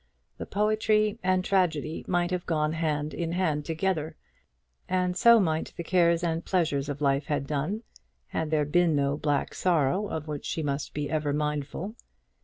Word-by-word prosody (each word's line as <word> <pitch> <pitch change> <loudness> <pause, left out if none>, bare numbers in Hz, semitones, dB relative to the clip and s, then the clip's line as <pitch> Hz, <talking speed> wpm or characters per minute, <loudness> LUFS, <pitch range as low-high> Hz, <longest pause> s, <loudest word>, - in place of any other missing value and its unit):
The - - -5
poetry 215 +1 +1
and 185 0 +1
tragedy 165 -5 0
might 175 0 +1
have 180 -1 -2
gone 155 -2 +1
hand 155 -2 -1
in 170 -1 -3
hand 155 -5 0
together; 160 -1 -1 0.7
and 180 -1 +1
so 235 +4 +7
might 160 -5 0
the 170 - -3
cares 170 -1 +3
and 165 -1 -1
pleasures 150 -6 0
of 145 +1 -4
life 140 0 +1
have 145 -2 -1
done, 155 - -2 0.5
had 160 -1 -2
there 150 -1 +2
been 165 +1 +3
no 140 0 +1
black 145 -1 -1
sorrow 180 +3 +1
of 160 -4 -5
which 150 -2 -5
she 160 - -2
must 140 0 -3
be 145 0 -2
ever 150 -1 -1
mindful. 150 +6 -2
160 Hz, 170 wpm, -27 LUFS, 150-180 Hz, 0.7 s, so